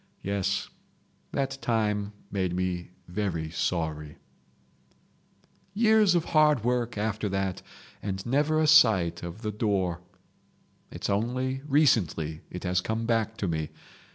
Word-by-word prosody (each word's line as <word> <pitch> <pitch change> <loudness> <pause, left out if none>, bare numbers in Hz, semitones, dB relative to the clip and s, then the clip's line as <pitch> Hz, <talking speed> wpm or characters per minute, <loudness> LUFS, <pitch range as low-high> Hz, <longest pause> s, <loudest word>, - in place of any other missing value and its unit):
Yes, 100 0 -1 0.6
that 135 0 -2
time 105 -3 0 0.2
made 95 -3 -1
me 90 -1 -2 0.2
very 90 -4 -2
sorry..... 80 -3 -2 1.6
"Years 215 -4 +5
of 170 - +1
hard 150 -6 +5
work 120 -2 0
after 105 0 -1
that 95 -1 -2 0.4
and 95 -1 -4
never 150 +5 +2
a 155 - +3
sight 110 - +5
of 85 +7 -7
the 105 - -1
door. 95 -5 0 0.9
It's - - -5
only 125 +6 -1
recently 105 - +2
it 90 - -7
has 90 +1 +1
come 110 +3 -2
back 115 -1 0
to 100 - -2
me. 80 -2 -2
105 Hz, 125 wpm, -28 LUFS, 90-125 Hz, 1.6 s, Years